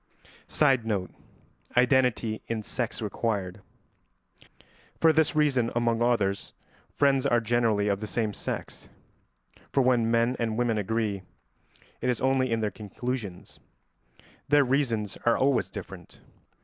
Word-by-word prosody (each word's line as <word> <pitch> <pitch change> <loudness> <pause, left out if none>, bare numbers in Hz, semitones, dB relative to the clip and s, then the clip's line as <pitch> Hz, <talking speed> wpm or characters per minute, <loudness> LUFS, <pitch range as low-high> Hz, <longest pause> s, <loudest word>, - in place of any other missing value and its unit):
[Sidenote: 115 -10 +1 0.7
Identity 125 -3 +2
in 115 -2 -3
sex 115 0 -3
required.] 100 -3 -2 1.4
For 160 -1 +5
this 155 0 +2
reason, 135 -6 +2
among 120 -1 +1
others, 105 -5 0 0.4
friends 140 -2 +3
are 120 - +3
generally 115 -2 +1
of 100 -1 0
the 110 - -5
same 110 -1 -1
sex, - - -6 0.8
for 135 - +3
when 120 -3 +3
men 115 +2 +2
and 115 -2 -1
women 120 -3 +1
agree, 105 -1 -1 0.8
it 125 - 0
is 125 - 0
only 130 -1 +1
in 115 -1 0
their 105 -1 -1
conclusions; 105 -2 -6 0.9
their 145 0 +5
reasons 120 -6 0
are 120 - +3
always 135 0 +2
different. - - -10
115 Hz, 125 wpm, -27 LUFS, 110-130 Hz, 1.4 s, For